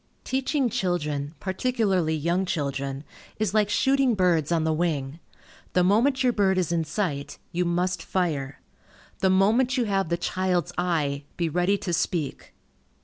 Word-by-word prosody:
Teaching 265 +1 0
children, 150 -7 -2
particularly 190 -5 0
young 170 +5 0
children, 140 -5 -3 0.3
is 210 -3 -1
like 210 -1 +3
shooting 265 +2 +2
birds 175 -5 +2
on 165 -2 +2
the 160 0 +1
wing. 155 -3 -1 0.5
The 180 - +4
moment 240 +9 +3
your 250 -1 +3
bird 195 -3 +2
is 180 -3 0
in 165 -1 0
sight, 155 -4 -3
you 175 +1 0
must 175 0 0
fire. 155 -7 -2 0.6
The 190 - +3
moment 225 +7 +3
you 245 - +2
have 195 -4 0
the 170 - +1
child's 180 0 -1
eye, 150 -5 -1
be 170 -2 0
ready 180 +5 +1
to 180 -2 -4
speak. 160 -4 -2
180 Hz, 150 wpm, -25 LUFS, 160-200 Hz, 0.6 s, The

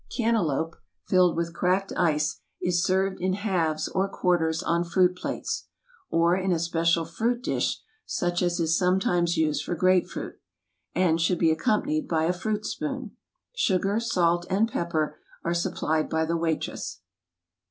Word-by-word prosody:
Cantaloupe, 170 - 0 0.3
filled 180 -2 +4
with 170 0 -2
cracked 185 +3 0
ice, 150 -3 +1 0.2
is 180 0 +1
served 190 0 +1
in 185 +1 +1
halves 180 -6 0
or 190 +1 0
quarters 170 -4 +1
on 170 0 +1
fruit 180 +1 +2
plates - - -4 0.4
(or 170 +1 +3
in 190 0 0
a 175 - +2
special 165 0 +1
fruit 235 +9 -1
dish, - - 0 0.3
such 175 0 -1
as 175 0 0
is 165 0 +2
sometimes 180 -2 +2
used 155 -2 +1
for 175 - -3
grape 185 +1 +3
fruit), - - -7 0.6
and 170 -2 +2
should 175 +2 +2
be 165 -1 +3
accom 210 - +1
panied 305 -1 -1
by 160 -2 +1
a 170 +2 +2
fruit 210 +3 -2
spoon. 265 -6 -4 0.4
Sugar, 200 - +1
salt, 175 -6 +1
and 200 +4 +2
pepper 155 -4 -1 0.2
are 170 - 0
supplied 160 -2 0
by 160 0 +1
the 165 +1 -1
waitress. 165 -1 -3
175 Hz, 155 wpm, -26 LUFS, 165-190 Hz, 0.6 s, filled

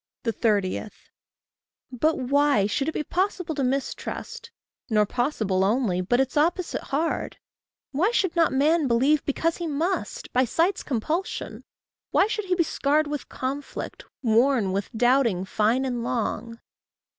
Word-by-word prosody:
30. 210 -4 0 1.0
But 305 +6 +1
why 280 -4 +3
should 275 +8 0
it - - -1
be 305 - -2
possible 360 -1 -1
to 280 -2 -1
mistrust 265 +1 -3 0.4
Nor 210 -2 +3
possible 215 -5 0
only, 205 -3 +1
but 245 +7 +1
its 265 -1 0
opposite 335 +4 +1
hard? 315 +4 -2 0.5
Why 330 +9 +2
should 380 -7 0
not 335 -2 +3
man 300 +3 +3
believe 270 +5 +3
because 325 +3 0
he 345 - -3
must 325 +6 -2
By 255 - +4
sight's 340 - +1
compulsion? 305 - -3 0.5
Why 380 - +4
should 425 -1 -3
he 365 -1 +1
be 345 - +3
scarred 305 0 +1
With 295 -1 -5
conflict? 275 +2 -5 0.2
worn 230 -2 +3
with 195 +1 -2
doubting 240 -6 +3
fine 225 +7 +1
and 245 -2 -2
long? 230 -1 -3
270 Hz, 140 wpm, -25 LUFS, 230-315 Hz, 1.0 s, By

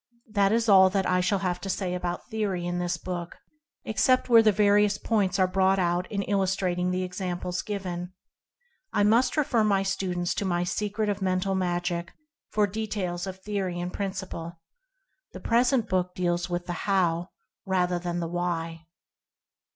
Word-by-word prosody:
This 200 -2 +2
is - - -4
all 190 -2 +7
that 195 0 0
I 180 0 +2
shall 200 +3 +1
have 180 -1 -1
to 195 - -5
say 185 -1 -2
about 175 -1 -4
theory 205 -6 -2
in 175 0 -2
this 175 0 -1
book, 175 0 -6 0.5
except 255 +4 +2
where 230 -1 +8
the 220 -1 +5
various 205 0 +3
points 200 -5 0
are 190 - +4
brought 190 +1 +2
out 175 0 0
in 200 -2 -1
illustrating 190 -2 0
the 185 0 -1
examples 180 -1 -3
given. 180 -3 -5 0.8
I 205 - +2
must 235 +7 +3
refer 245 -7 +2
my 200 -2 +2
students 180 -2 -1
to - - -2
my 175 -2 0
"Secret 210 +4 -2
of 205 -1 -2
Mental 185 +1 0
Magic" 175 -2 -2 0.4
for 210 -1 +2
de 215 +2 -4
tails 180 -3 -3
of 190 0 -7
theory 195 -4 -2
and 180 +1 -4
principle. 190 -4 -5 0.7
The - - -7
present 240 0 +2
book 180 -1 -1
deals 175 0 -1
with 175 0 -2
the 175 - -3 0.2
"HOW?" 175 -2 +1 0.4
rather 180 -2 +1
than 175 0 -3
the 170 - -2
"Why?" 165 -2 -3
185 Hz, 170 wpm, -27 LUFS, 175-205 Hz, 0.8 s, where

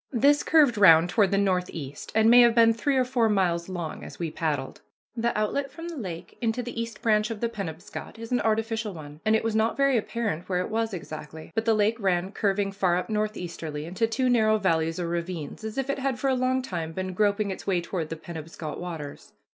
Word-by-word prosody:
This 285 +4 +4
curved 290 -9 +4
round 165 -3 +7
toward 205 -2 +3
the 200 - +1
northeast, 180 -7 -2
and 220 0 +5
may 245 +2 +8
have 235 -1 +5
been 230 -1 +6
three 270 +4 0
or 255 - +3
four 245 -3 +2
miles 180 -4 +1
long 175 -4 -5
as - - -9
we 165 -2 -3
paddled. 150 -5 -3 0.3
The 235 -1 0
outlet 270 +7 -1
from 335 +1 -8
the 335 - -6
lake 185 - -7
into 235 +1 0
the 235 -1 -4
East 230 -1 -7
Branch 215 -2 +3
of 225 -2 -5
the 235 - 0
Penobscot 195 -1 -7
is 230 +1 -8
an 245 - +2
artificial 220 -2 -1
one, 150 -1 -10
and 215 0 +3
it 220 - +1
was 225 -1 -1
not 220 +1 +1
very 275 -2 +3
apparent 215 -6 -3
where 180 -1 +1
it 185 - -4
was 225 0 0
exactly, 155 -3 -8
but 225 - -1
the 225 -1 +4
lake 215 +2 +2
ran 190 -2 0
curving 200 -1 0
far 185 -3 +1
up 180 - -4
northeasterly 175 -8 -3
into 190 +7 0
two 255 +3 0
narrow 220 -3 +4
valleys 165 -4 0
or 175 - -2
ravines, 170 0 -4
as 220 +2 -5
if 270 -1 -1
it 275 - -1
had 265 -2 -1
for 270 +1 0
a - - +2
long 255 0 +1
time 165 -8 -4
been 185 +1 -4
groping 205 +1 +1
its 190 - -8
way 185 -3 +2
toward 170 -2 -4
the 165 - -4
Penobscot 160 -1 -7
waters. 165 -5 -7
210 Hz, 225 wpm, -26 LUFS, 170-230 Hz, 0.3 s, may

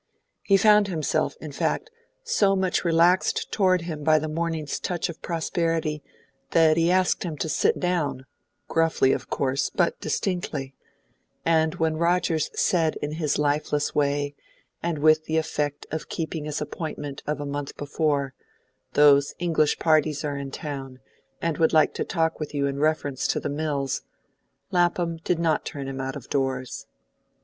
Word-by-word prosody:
He 195 - +4
found 210 +1 +5
himself, 155 -5 -1
in 155 - -7
fact, 420 - -2 0.3
so 205 - +2
much 190 -1 0
relaxed 170 +2 +3
towards 185 -4 +2
him 155 -3 -5
by 155 +1 +5
the 155 +1 -2
morning's 160 -1 -2
touch 175 -3 -2
of 170 - -8
prosperity 165 -2 -1 0.5
that 160 -1 +5
he 165 +1 +2
asked 185 0 +2
him 165 -4 -4
to 160 - -2
sit - - +1
down, 170 -7 -1 0.4
gruffly, 165 -5 +2
of - - -4
course, 135 0 0
but 175 -3 0
distinctly; 155 -8 -2 0.7
and 160 -1 +2
when 160 -1 0
Rogers 170 -2 +1
said 165 -3 +2
in 145 - -4
his 155 -2 -1
lifeless 150 0 0
way, 145 0 0 0.5
and 170 -2 -1
with 155 +1 +4
the 160 +1 0
effect 150 -2 -2
of 160 0 -4
keeping 160 -2 -4
his 150 0 -3
appointment 150 -2 -5
of 150 -1 -1
a 145 - -4
month 140 0 -5
before, 145 -2 -1 0.6
"Those 140 -1 +5
English 165 -3 +1
parties 155 -2 +2
are 145 -1 -2
in 140 -1 -5
town, 135 -2 -6 0.5
and 165 -2 -1
would 160 0 +3
like 155 -1 +4
to - - -2
talk 165 -2 -1
with 150 -1 -5
you 140 -1 +1
in 140 0 -2
reference 145 -3 0
to - - 0
the - - -3
mills," 145 -2 -2 0.7
Lapham 175 -2 +1
did 165 +1 -1
not 165 -2 +1
turn 140 -2 -6
him 135 0 -4
out 135 0 -4
of 140 - -8
doors. 130 -2 -2
155 Hz, 160 wpm, -25 LUFS, 145-170 Hz, 0.7 s, found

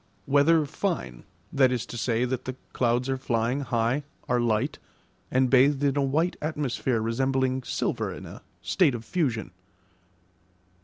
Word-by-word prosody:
Weather 145 +3 +4
fine; 155 - -3 0.3
that 130 -2 +4
is 125 -3 -1
to - - -9
say, 120 +1 0
that 125 0 -3
the 130 - -4 0.2
clouds 120 +1 +1
are 135 0 0
flying 120 +1 0
high, 120 0 0 0.3
are 125 0 +2
light, 120 +5 0 0.5
and 130 0 +3
bathed 135 +2 +4
in 140 -1 +2
a 145 - +2
white 155 +6 +1
atmosphere 135 -5 -1
resembling 130 +3 0
silver - - -2
in - - -8
a - - -10 0.2
state 165 -9 +3
of 115 -1 -7
fusion. 120 - -1
130 Hz, 150 wpm, -26 LUFS, 120-145 Hz, 0.5 s, Weather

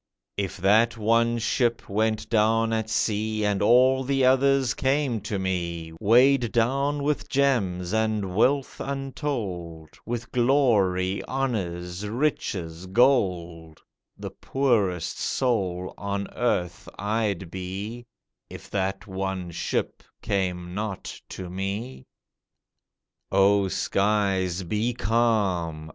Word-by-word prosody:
If 100 -2 -3
that 110 +5 +3
one 115 +2 +2
ship 120 0 0
went 110 +1 0
down 115 0 +2
at 110 -1 -1
sea, 110 0 0
And 105 -1 0
all 130 +4 +5
the 135 0 +1
others 135 0 +3
came 135 -4 0
to 105 0 -3
me, 85 -3 -3
Weighed 125 +3 +4
down 140 +5 +1
with 150 0 -1
gems 105 -10 +1
and 110 -4 0
wealth 135 +7 +1
untold, 115 - -4
With 115 -1 -5
glory, 105 -8 +2
honours, 95 -8 -3
riches, 95 - -2
gold, 90 - +1 0.4
The - - -6
poorest 105 - 0
soul 95 -8 -1
on 100 0 -3
earth 90 -8 -1
I'd 105 -4 -1
be 100 +6 -6 0.4
If - - -11
that 95 0 -2
one 95 -2 -4
ship - - -2 0.2
came 90 -3 -2
not 105 -1 -5
to 95 - -7
me. 95 - -5 1.2
O 100 0 +4
skies, 95 -2 0
be 105 +7 -1
calm! 95 -9 0
105 Hz, 105 wpm, -25 LUFS, 95-120 Hz, 1.2 s, all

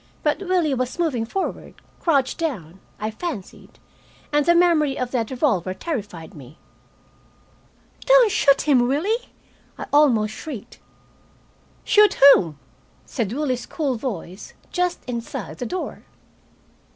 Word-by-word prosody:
But 300 -1 +1
Willie 360 -6 +1
was 255 +2 -2
moving 275 -10 -1
forward, 385 +10 -4 0.2
crouched 280 -5 +1
down, 195 - -4 0.2
I 215 +1 -3
fancied, 230 - -7 0.6
and 295 0 +3
the 345 - +5
memory 325 -5 +3
of 250 -1 -3
that 230 -4 -1
revolver 215 - 0
terrified 205 - -6
me. 140 0 -13 1.5
"Don't - - +6
shoot 280 -9 +3
him, 255 -5 +3
Willie!" 395 - -1 0.5
I - - -6
almost 235 -8 +4
shrieked. 250 -2 -9 1.0
"Shoot 420 -1 +5 0.2
whom?" 160 -6 0 0.5
said 225 -6 -3
Willie's 255 -2 -2
cool 290 -5 -2
voice, 210 -6 -6 0.2
just 360 -1 -1
inside 235 -2 -6
the 245 - -3
door. 370 - -5
265 Hz, 120 wpm, -22 LUFS, 220-335 Hz, 1.5 s, Don't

